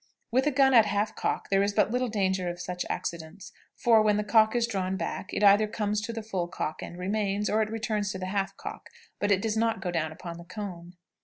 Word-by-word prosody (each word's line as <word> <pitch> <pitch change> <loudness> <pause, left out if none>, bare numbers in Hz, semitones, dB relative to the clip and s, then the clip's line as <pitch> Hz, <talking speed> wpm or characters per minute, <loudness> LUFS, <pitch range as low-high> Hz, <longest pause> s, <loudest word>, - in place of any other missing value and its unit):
With 260 +4 +2
a - - +3
gun 270 0 +4
at 225 -3 +7
half 205 +1 -1
cock - - -2
there 195 0 +4
is 200 +1 +1
but 205 - +2
little 250 +1 0
danger 190 -4 0
of 175 0 -6
such 180 0 -4
accidents; 170 +3 -5 0.2
for, 230 -2 +4
when 210 -1 +3
the 210 - 0
cock 220 +2 +4
is 240 -1 +3
drawn 190 -3 -2
back, 190 - -4
it - - -1
either 205 +1 +6
comes 210 -1 -1
to 230 - -4
the 225 -1 -5
full 190 -5 -2
cock, 155 -2 -4
and 175 - -8
remains, 200 +2 -1
or 220 - +3
it 215 - 0
returns 215 -2 -2
to - - -4
the 185 - -4
half 195 +1 -2
cock, - - -8 0.3
but 205 - +1
does 220 +1 -1
not 225 -2 +1
go 180 -2 -3
down 160 -2 -1
upon 170 +1 -8
the - - -9
cone. 180 -2 -8
205 Hz, 240 wpm, -28 LUFS, 185-220 Hz, 0.3 s, at